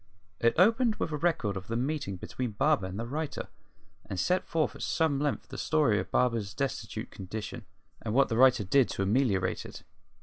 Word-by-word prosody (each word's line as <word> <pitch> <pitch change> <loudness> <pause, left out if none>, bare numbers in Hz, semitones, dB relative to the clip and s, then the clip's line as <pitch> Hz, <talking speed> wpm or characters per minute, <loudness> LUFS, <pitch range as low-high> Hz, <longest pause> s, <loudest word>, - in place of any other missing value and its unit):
It 115 - +3
opened 225 +5 +4
with - - -3
a - - -1
record 150 -11 0
of 95 0 -6
the 115 - -3
meeting 130 -5 -2
between 120 +5 -4
Barber 135 -3 +2
and 95 +3 -6
the 115 - -3
writer, 150 +5 -4 0.5
and 95 -3 -5
set 180 - +1
forth 160 -1 0
at - - -10
some 160 -4 +1
length 145 -1 -2
the - - -7
story 145 -10 +2
of - - -4
Barber's 115 -5 0
destitute 140 0 -3
condition, 105 +4 -6 0.4
and 110 - -3
what 135 +4 +4
the 115 - -1
writer 125 -3 +6
did 130 +7 +3
to 95 - -2
ameliorate 105 -2 +1
it. - - -10
125 Hz, 195 wpm, -29 LUFS, 105-150 Hz, 0.5 s, writer